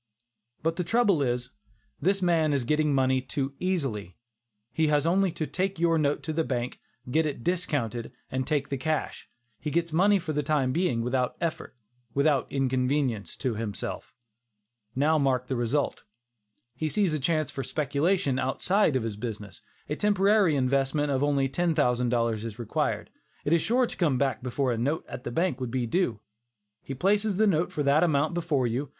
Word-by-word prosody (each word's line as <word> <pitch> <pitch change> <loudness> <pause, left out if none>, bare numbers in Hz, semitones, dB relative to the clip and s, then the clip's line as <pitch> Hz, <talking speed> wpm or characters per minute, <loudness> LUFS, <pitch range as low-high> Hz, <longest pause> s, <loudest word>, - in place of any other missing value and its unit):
But 165 +1 0
the 180 - 0
trouble 200 -3 +3
is, 125 -1 -1 0.5
this 195 +4 +1
man 165 -4 +3
is 140 -3 +1
getting 150 +4 +1
money 130 -1 +2
too 135 +1 -3
easily. 135 - -2 0.6
He 160 -1 +2
has 150 0 +2
only 185 +2 +3
to 165 -2 -2
take 185 +6 -2
your 165 -1 +2
note 145 -1 0
to 160 - -3
the 160 +1 +1
bank, 125 -4 -3 0.3
get 160 +3 +2
it 140 -5 -5
discounted 145 - -1 0.2
and 130 0 -2
take 145 -2 0
the 140 - -3
cash. 155 +2 -2 0.3
He 150 - -3
gets 170 +1 -1
money 200 +5 +4
for 165 -4 -4
the 150 - +1
time 140 -3 +1
being 160 -7 0
without 125 +1 -1
effort; 165 -5 -3 0.4
without 140 -1 +2
inconvenience 130 -3 0
to 130 -4 -1
himself. 105 -2 -5 0.8
Now 155 +4 +3
mark 130 -3 +1
the 130 - -2
result. 120 +4 -1 0.7
He 155 +4 -2
sees 195 -2 +1
a 155 - 0
chance 155 0 0
for 135 - -4
speculation 145 +1 0
outside 165 +5 +1
of 130 - +1
his 110 -3 -4
business. 105 -4 -6 0.3
A 150 - -2
temporary 200 -3 +3
investment 140 +2 +1
of 135 0 +1
only 140 -2 +2
$10,000 125 -7 +1
is 115 -1 -6
required. 120 -3 -2 0.3
It 150 - +2
is 170 - +4
sure 245 +3 +2
to - - -7
come 150 -8 +2
back 135 0 0
before 130 +1 -1
a 115 - -1
note 145 +7 -1
at 125 - -8
the - - -3
bank 165 -2 0
would 125 - -2
be 125 0 -1
due. 120 - 0 0.6
He 135 - -6
places 200 +6 +1
a 220 - +5
note 175 -4 +2
for 150 - -2
that 140 +2 +4
amount 155 -1 +2
before 165 -7 0
you. 125 +4 -2
145 Hz, 180 wpm, -27 LUFS, 130-165 Hz, 0.8 s, a